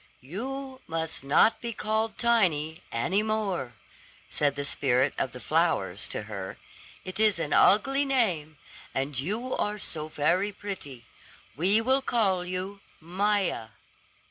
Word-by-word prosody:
"You 260 - -6
must 160 -3 -2
not 145 +11 +4
be 235 -1 -3
called 220 0 -1
Tiny 175 -10 +2
any 180 - +1
more," 210 - -1 0.6
said 145 -2 +1
the 145 0 -2
spirit 135 -1 +2
of 130 - -1
the 125 - -9
flowers 155 - 0
to - - -3
her. 100 -3 -6 0.5
"It 185 +2 -6
is 215 -3 +4
an 165 -3 -2
ugly 270 +8 +5
name, 185 - 0 0.4
and 135 0 -1
you 220 - -2
are 210 0 -1
so 155 -6 -2
very 170 +7 +1
pretty. 170 - -7 0.5
We 190 - +3
will 260 +4 +3
call 200 -8 +1
you 185 +2 -4 0.2
Maia." 185 - 0
185 Hz, 135 wpm, -28 LUFS, 145-215 Hz, 0.6 s, ugly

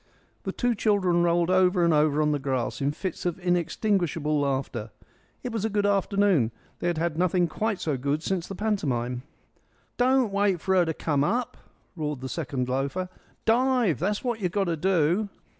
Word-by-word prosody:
The - - -1
two 245 -1 0
children 200 -5 +2
rolled 170 0 +2
over 185 -1 +4
and 170 - +3
over 150 0 +3
on 150 - +2
the 145 - 0
grass 130 -2 -2
in 140 +1 +1
fits 185 +3 -5
of 175 -2 -1
inextinguishable 175 -3 0
laughter. 130 -5 -2 0.5
It 250 - -3
was 220 -3 -2
a 220 - +1
good 205 -1 0
afternoon; 200 - +2 0.3
they - - -2
had 175 -2 0
had 165 0 -1
nothing 180 0 +2
quite 215 +4 -2
so 150 -3 -1
good 140 +4 -1
since 185 -2 -2
the 195 - -6
pantomime. 130 - -1 0.8
"Don't 250 -3 +3
wait 200 -3 +2
for 190 +3 0
her 180 -2 +4
to 160 - -1
come 145 -3 0
up," 235 +8 -1 0.4
roared 150 -5 -3
the 130 - -5
second 135 -5 -3
loafer. 140 +8 -2 0.4
"Dive. 240 - +2
That's 205 +5 -1
what 240 -3 -1
you've 180 -4 -1
got 200 +1 +1
to 170 -3 -1
do." 180 +4 +1
175 Hz, 185 wpm, -26 LUFS, 150-205 Hz, 0.8 s, over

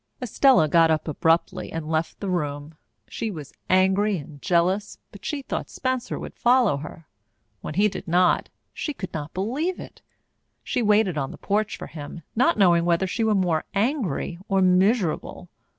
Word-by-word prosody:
Estella 250 - +4
got 165 +1 +4
up 155 0 0
abruptly 165 +2 0
and 165 -1 -5
left 160 +1 -2
the 200 - -4
room. 145 -3 -3 0.3
She 225 - -4
was 155 -8 -8 0.2
angry 190 +2 +3
and 145 -2 -10
jealous, 185 +3 +1
but 200 - -14
she 290 -3 -3
thought - - -4
Spencer 255 -1 -2
would - - -7
follow 240 - +3
her. 155 +3 -10 0.5
When 150 - -6
he 205 +3 +4
did 195 - -6
not, 180 +2 +2 0.2
she 300 - -4
could 185 -6 -7
not 150 0 -6
believe 270 - -2
it. - - -11 0.6
She - - -1
waited 210 -6 +3
on 135 -1 -2
the - - -10
porch 210 +1 -1
for - - -7
him, 155 +2 -9
not 295 +9 +3
knowing 175 -4 +4
whether 170 +2 +2
she 225 +5 -2
were 220 -1 +2
more 175 -5 +1
angry 200 - -1
or 195 -1 +2
miserable. 185 0 +1
185 Hz, 170 wpm, -24 LUFS, 165-215 Hz, 0.6 s, Estella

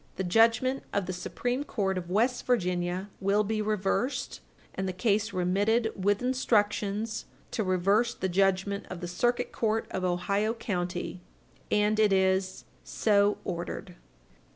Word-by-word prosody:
The 190 - -2
judgment 230 +7 +3
of 200 -2 0
the 185 - -4
Supreme 245 +8 -2
Court 195 -9 -1
of 180 -1 -5
West 235 +7 +1
Virginia 180 -4 0
will 200 +2 +2
be 215 +1 -1
reversed, 215 +5 -1 0.3
and 190 - -3
the 185 - -2
case 215 +2 +1
remitted 205 +6 +1
with 205 +3 +1
instructions 215 -4 0 0.3
to 220 - -1
reverse 200 +6 +2
the 190 - -2
judgment 195 +2 +1
of 185 - -6
the 175 - -4
Circuit 240 +8 0
Court 225 0 0
of 185 - -3
Ohio 200 +5 0
county, 180 -5 -3 0.5
and 210 +1 +2
it 215 -2 +4
is 190 0 +1 0.2
So 205 -1 +2
ordered. 175 0 -5
200 Hz, 140 wpm, -28 LUFS, 185-220 Hz, 0.5 s, it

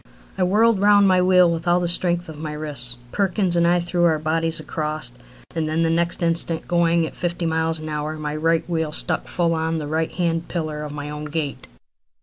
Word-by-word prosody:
I 190 - -4
whirled 210 +4 +3
round 205 0 +5
my 185 -1 +4
wheel 180 -1 +5
with 165 +1 -3
all 175 +1 +4
the 175 - -1
strength 175 0 0
of 155 -2 -9
my 155 -1 -5
wrists. 140 -6 -3
Perkins 190 -2 +1
and 170 0 +3
I 175 +1 +3
threw 175 0 +1
our 160 -2 +3
bodies 165 +1 -1
across, 155 -5 -4 0.4
and 160 -2 -1
then 160 +2 0
the 165 - +2
next 170 +1 0
instant, 165 -1 +1
going 170 -1 +2
at - - -7
fifty 175 -1 -2
miles 160 0 0
an 155 0 -7
hour, 150 0 -3
my 150 -1 -4
right 165 +1 +2
front - - -20
wheel 160 -2 -1
struck - - -1
full 170 -1 0
on 160 0 -1
the 155 -2 -3
right 160 +2 -1
hand 170 -2 -1
pillar 155 -3 -3
of 150 -1 -5
my 145 0 -6
own 150 0 -6
gate. 150 -2 -4
165 Hz, 220 wpm, -22 LUFS, 155-175 Hz, 0.4 s, round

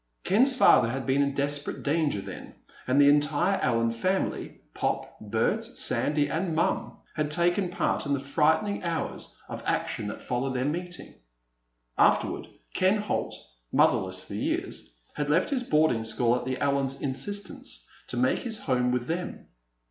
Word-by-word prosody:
Ken's 255 +8 +4
father 125 - +6
had 130 +2 -3
been 135 +1 +2
in 140 -1 0
desperate 145 +1 -1
danger 145 -7 +1
then, - - -9 0.3
and 130 +2 +3
the 140 - +7
entire 150 +6 +3
Allen 115 -2 +2
family—Pop, 185 +12 -3
Bert, - - 0
Sandy, 145 -1 +1
and 160 +3 -2
Mom—had 155 -2 -2
taken 175 +4 +2
part 175 - -1
in 140 - +1
the 140 - 0
frightening 160 +9 +1
hours 170 -2 -3
of - - -6
action 105 - -1
that 105 - -7
followed 130 +2 -2
their 130 +1 0
meeting. 175 +4 -4 0.9
Afterward, - - +2 0.3
Ken 190 +3 +3
Holt, 210 -1 -2 0.4
motherless - - +2
for - - -10
years, - - -2 0.2
had 145 0 -3
left 165 - +2
his 260 -3 +1
boarding 150 - +2
school 115 +1 +2
at 125 0 -3
the 130 0 -2
Allens' 140 -1 0
insistence 135 - -2 0.2
to - - 0
make 130 +1 +2
his 225 -3 -2
home 125 -6 0
with 125 -1 -1
them. 175 +5 -5
145 Hz, 150 wpm, -27 LUFS, 130-175 Hz, 0.9 s, the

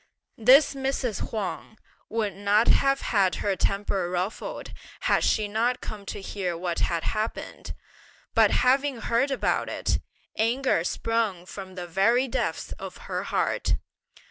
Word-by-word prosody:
This 260 +8 +7
Mrs. 265 -5 -2
Huang 220 0 -4 0.3
would 215 -3 -1
not 205 +3 +2
have 275 0 +4
had 195 -4 +2
her 200 -2 0
temper 195 -1 0
ruffled 180 +4 -4 0.3
had - - +2
she 215 -1 +2
not 230 +4 0
come 205 -2 -8
to - - -4
hear 190 -3 -3
what 175 0 -2
had 170 -2 0
happened; 215 +1 -3 0.6
but - - +5
having 265 -1 +2
heard 235 +6 +1
about 270 - 0
it, - - 0 0.4
anger 235 -3 +2
sprung 215 -2 -1
from 190 0 -9
the 180 -1 -5
very 225 +9 +3
depths - - -2
of - - -7
her - - -3
heart. - - 0
215 Hz, 140 wpm, -26 LUFS, 190-245 Hz, 0.6 s, This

